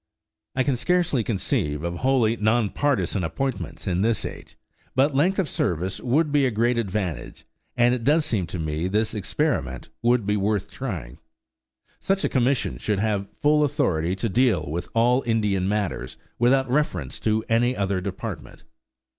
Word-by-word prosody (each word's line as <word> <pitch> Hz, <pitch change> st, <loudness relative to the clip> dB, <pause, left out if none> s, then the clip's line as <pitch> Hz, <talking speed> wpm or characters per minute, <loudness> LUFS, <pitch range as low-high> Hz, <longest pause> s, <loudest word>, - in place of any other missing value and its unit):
I 130 Hz, -, +2 dB
can 130 Hz, 0 st, +1 dB
scarcely 160 Hz, 0 st, +1 dB
conceive 80 Hz, -8 st, -1 dB
of 85 Hz, 0 st, -3 dB
wholly 125 Hz, -1 st, +2 dB
non 110 Hz, -1 st, +1 dB
partisan 140 Hz, -9 st, 0 dB
appointments 135 Hz, +10 st, -3 dB
in 90 Hz, -2 st, 0 dB
this 115 Hz, +1 st, +1 dB
age, -, -, -9 dB, 0.4 s
but 135 Hz, +3 st, +3 dB
length 170 Hz, +8 st, +2 dB
of 190 Hz, -, +1 dB
service 90 Hz, -, -1 dB
would 145 Hz, +5 st, +1 dB
be 140 Hz, -2 st, +3 dB
a -, -, +1 dB
great 120 Hz, +2 st, +1 dB
advantage, 95 Hz, -6 st, -3 dB, 0.3 s
and 120 Hz, 0 st, +4 dB
it 125 Hz, -2 st, -2 dB
does 150 Hz, +4 st, +3 dB
seem 95 Hz, -7 st, -1 dB
to 90 Hz, -, -5 dB
me 80 Hz, +1 st, -2 dB
this 105 Hz, +4 st, 0 dB
experiment 100 Hz, -, -2 dB
would 120 Hz, -2 st, +2 dB
be 105 Hz, +1 st, +1 dB
worth 100 Hz, 0 st, -1 dB
trying. 90 Hz, -, -6 dB, 0.8 s
Such 195 Hz, 0 st, 0 dB
a -, -, +1 dB
commission 130 Hz, +1 st, +1 dB
should 105 Hz, -2 st, -1 dB
have 100 Hz, -2 st, 0 dB, 0.2 s
full 150 Hz, +1 st, +4 dB
authority 90 Hz, -, 0 dB
to 95 Hz, +4 st, -2 dB
deal 110 Hz, -7 st, +2 dB
with 85 Hz, +2 st, -4 dB
all 120 Hz, +3 st, +4 dB
Indian 105 Hz, -4 st, +1 dB
matters 105 Hz, -2 st, -2 dB, 0.2 s
without 130 Hz, +3 st, +3 dB
reference 120 Hz, -, -1 dB
to 110 Hz, 0 st, 0 dB
any 120 Hz, +3 st, +2 dB
other 100 Hz, -1 st, 0 dB
department. 95 Hz, -1 st, -6 dB
110 Hz, 165 wpm, -24 LUFS, 95-130 Hz, 0.8 s, and